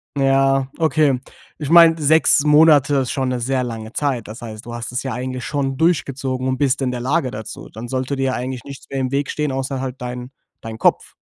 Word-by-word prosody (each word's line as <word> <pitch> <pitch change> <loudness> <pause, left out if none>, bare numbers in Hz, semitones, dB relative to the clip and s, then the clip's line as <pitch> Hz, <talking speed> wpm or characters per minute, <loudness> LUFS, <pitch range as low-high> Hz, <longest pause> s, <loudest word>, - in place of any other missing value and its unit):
Ja, 135 -1 +2
okay. 155 -5 +2 0.4
Ich 150 -1 -4
meine, 165 -1 +7
6 150 0 +4
Monate 150 -2 +5
ist 130 -2 0
schon 130 -2 -1
'ne 125 -1 -2
sehr 130 +2 -1
lange 115 -2 -6
Zeit. 135 -6 -1
Das 110 +3 -9
heißt, 110 -1 -8
du 120 - -7
hast 120 -1 -6
es 125 - -3
ja 130 -3 -3
eigentlich 130 +1 -4
schon 135 -2 -2
durchgezogen 135 -5 0
und 130 0 0
bist 135 -1 +1
in 130 - 0
der 125 -1 -4
Lage 135 +2 0
dazu. 110 0 -8
Dann 115 +3 -8
sollte 130 +2 -2
dir 135 0 -1
ja 130 - 0
eigentlich 125 -1 -4
nichts 140 -1 -11
mehr 135 - -3
im 130 0 -2
Weg 140 0 -1
stehen, 150 -2 -2
außer 135 0 -3
halt 130 -1 -4
dein 125 +1 -6 0.3
dein 110 -1 -7
Kopf. - - +1
130 Hz, 225 wpm, -20 LUFS, 125-140 Hz, 0.4 s, meine